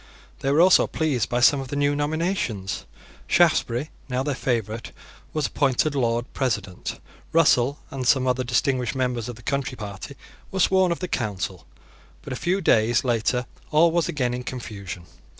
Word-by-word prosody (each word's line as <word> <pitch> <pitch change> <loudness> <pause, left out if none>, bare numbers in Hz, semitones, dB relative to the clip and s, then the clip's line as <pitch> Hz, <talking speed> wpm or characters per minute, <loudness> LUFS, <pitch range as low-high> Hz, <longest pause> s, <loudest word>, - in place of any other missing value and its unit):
They 135 - 0
were 150 +4 +5
also 185 +1 +6
pleased 145 -8 -1
by 120 0 0
some 140 +3 +6
of 135 - -5
the 145 - -5
new 145 0 +2
nominations. 145 - -2 0.4
Shaftesbury, 120 +6 +2 0.2
now 125 +1 0
their 145 0 -1
favourite, 115 -3 -2 0.4
was 155 -1 -1
appointed 140 +1 +1
Lord 120 -3 0
President. 110 -8 -2 0.3
Russell 140 -4 +4
and 130 -2 -3
some 130 0 +4
other 130 0 +1
distinguished 125 0 0
members 125 -3 -1
of 120 - -6
the 115 - -15
Country 140 0 -2
Party 105 +5 -7 0.3
were 190 - -4
sworn 190 -1 +4
of 170 - -2
the 180 - -2
Council. 100 - -3 0.6
But - - -5
a - - -3
few 185 +8 0
days 120 -6 +3
later 125 0 0 0.2
all 160 +2 +5
was 170 0 +1
again 125 -5 -1
in 125 - -3
confusion. 100 -8 -7
130 Hz, 170 wpm, -24 LUFS, 115-145 Hz, 0.6 s, also